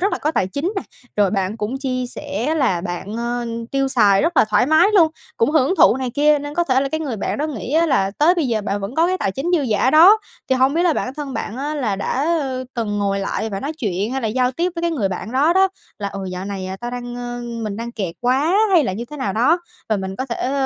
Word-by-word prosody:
rất 400 +3 +1
là - - -1
có 305 - 0
tài 255 - 0
chính 285 - -2
nè, 390 - -1 0.3
rồi 205 -2 +3
bạn 195 +1 -1
cũng 215 +4 -3
chi 255 -2 -2
sẻ 285 +2 -3
là 255 - +1
bạn, 175 +5 -5
ờ, 240 +1 -2 0.2
tiêu 275 0 +1
xài 210 -7 +4
rất 330 +2 0
là - - +6
thoải 210 +3 +3
mái 315 +6 +5
luôn, 335 -5 +6 0.3
cũng 230 - +2
hưởng 310 +2 +3
thụ 275 - +6
này 260 -2 -3
kia, 300 +1 +4
nên 290 +1 -6
có 345 - +1
thể 260 -4 +2
là 275 - -1
cái 315 +2 -2
người 275 -7 -3
bạn 205 - -3
đó 300 - 0
nghĩ 260 -4 -5
á 330 +2 +3
là 195 -10 +2
tới 330 +5 +5
bây 320 -7 0
giờ 225 -2 0
bạn 205 -1 -2
vẫn 200 +5 -5
có 330 +3 +3
cái 370 +1 0
tài 195 - -1
chính 270 - -4
dư 295 - 0
giả 245 +1 +2
đó. 355 +8 +8 0.3
Thì - - +5
hông 265 +2 +3
biết 335 - +2
là 350 -2 +3
bản 260 -3 -3
thân 285 -3 -6
bạn 220 - -4
á, 290 +3 -3
là 235 -9 -1
đã 260 +8 -1 0.5
từng 215 -4 -2
ngồi 200 -1 0
lại 220 +3 -2
và 195 -1 -4
nói 285 +3 -3
chuyện 205 - -2
hay 270 - -1
là 225 - 0
giao 250 +3 +1
tiếp 345 +6 -1
với 335 - -4
cái 340 - +1
người 275 -11 -2
bạn 195 +4 -5
đó 285 +6 +3
đó, 380 +1 +4 0.3
là 200 -2 -3
"Ừ, 195 0 -6
dạo 180 +1 -5
này 195 -2 -5
tao 240 0 -4
đang, 245 0 -6
ờ 245 0 -5 0.2
mình 210 -2 -3
đang 235 +1 -5
kẹt 190 -7 -4
quá 270 +9 +2 0.2
hay 330 -6 +5
là 190 - -1
như 220 +5 -4
thế 300 - -7
nào 235 -9 -2
đó, 255 - +3 0.3
và 215 - +2
mình 190 0 -5
có 260 - -3
thể 250 +2 -2
255 Hz, 280 wpm, -20 LUFS, 210-300 Hz, 0.5 s, đó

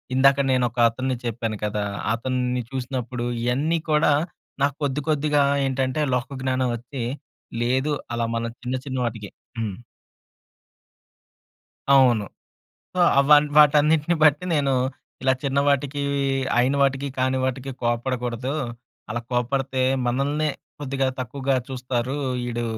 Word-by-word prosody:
ఇందాక 135 +1 +5
నేను 130 -1 +3
ఒకతన్ని 120 +2 +1
చెప్పాను 115 -2 -2
కదా! 105 0 -1 0.3
అతన్ని 125 +1 -1
చూసినప్పుడు 125 -2 -4 0.2
ఇయన్నీ 145 +7 +1
కూడా 150 -1 +4 0.5
నాకు 140 -1 +1
కొద్ది, 140 +1 0
కొద్దిగా 150 -1 +2 0.2
ఏంటంటే 130 +1 0
లోక‌జ్ఞానం 130 0 -1
వచ్చి, 120 +2 -6 0.6
లేదు 130 +5 +1 0.2
అలా 115 -1 0
మళ్ళ 115 0 -1 0.2
చిన్న, 125 +1 -2
చిన్న 130 -2 -4
వాటికి 110 -3 -5 0.3
హ్మ్. 105 -4 -3 2.1
అవును. 125 -6 +5 0.7
సో, - - -4 0.2
అవ 140 - +1 0.3
వాటన్నిటిని 150 +2 +5
బట్టి 150 +3 +4
నేను, 140 -3 +2 0.5
ఇలా 130 0 +4
చిన్నవాటికి 140 0 +1 0.6
అయిన 125 +3 +3
వాటికి 135 0 +1
కాని 130 0 +1
వాటికీ 130 +1 -2
కోప్పడకూడదు. 120 +1 -1 0.6
అలా 120 +2 -2
కోప్పడితే, 130 +2 0 0.2
మనల్నే 140 +5 0 0.3
కొద్దిగా 135 -1 -1
తక్కువగా 135 +2 -1
చూస్తారు. 125 0 -2 0.3
ఈడు 120 0 -2
130 Hz, 110 wpm, -24 LUFS, 120-140 Hz, 2.1 s, ఇందాక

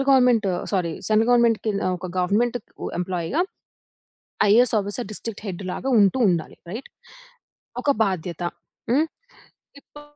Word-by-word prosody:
Central - - -2
government 250 -5 +5 0.3
sorry 175 -4 0
central 220 +2 +3
గవర్నమెంట్‌కి 235 -2 +4
కింద, 200 -1 0 0.2
ఒక 185 - -6
గవర్నమెంట్‌కు 215 +6 -1
ఎంప్లాయ్‌గా 180 - -1 1.1
ఐఏఎస్ 235 +2 +5
ఆఫీసర్ 205 +3 -2
డిస్ట్రిక్ట్ 215 0 -6
హెడ్డులాగా 185 +6 -4
ఉంటూ 200 +6 +4
ఉండాలి. 170 -3 -1
రైట్. 230 +7 -6 0.9
ఒక 285 - +1
బాధ్యత. 175 -3 -3 0.5
హ్మ్? 300 +6 +3 0.7
ఇపుడు 295 +1 -15
210 Hz, 120 wpm, -23 LUFS, 185-245 Hz, 1.1 s, government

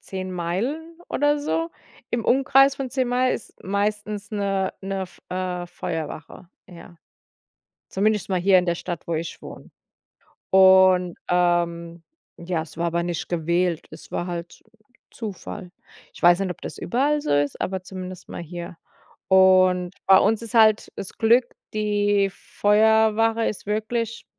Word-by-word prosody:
10 185 -1 -6
Meilen 250 - -3
oder 290 +1 +1
so. 330 +3 -2 0.4
Im 235 -2 -2
Umkreis 270 +1 +4
von 265 -2 -4
10 260 -2 0
Meilen 250 +1 +2
ist - - -9
meistens 205 +1 -2
'ne 195 -2 -1
'ne 195 0 -3
F 185 - -11
äh, 180 -1 -3
Feuerwache, 165 +1 -6 0.2
ja. 175 -1 -14 0.9
Zumindest 210 +1 0
mal 185 -1 0
hier 190 0 +5
in 180 - 0
der 170 - +1
Stadt, 175 -2 -6
wo 170 - -2
ich 160 +1 -5
wohne. - - -11 0.8
Und, 190 -2 +5
ähm, 170 -1 0 0.4
ja, 170 -2 -2
es 160 0 -13
war 170 - 0
aber 170 0 0
nicht 175 -1 -4
gewählt. 170 0 0
Es 155 - -13
war 175 - -2
halt 170 -1 -5
Z - - -19 0.5
Zufall. 205 -3 -7 0.4
Ich - - -14
weiß 175 +2 +6
nicht, 195 - -1
ob 180 - -8
das - - -7
überall 285 - 0
so 300 - -2
ist, 145 0 0
aber 190 -1 -2
zumindest 185 -1 -9
mal - - -7
hier. 175 +1 -8 0.5
Und 185 -1 +4
bei 190 0 +8
uns 225 0 +2
ist 230 +1 -8
halt 220 -1 +4
das 195 - -6
Glück, 235 +2 +4 0.3
die 205 -2 +1
Feuerwache 220 +2 +2
ist 205 - -4
wirklich, 225 +2 -2
190 Hz, 155 wpm, -23 LUFS, 175-220 Hz, 0.9 s, bei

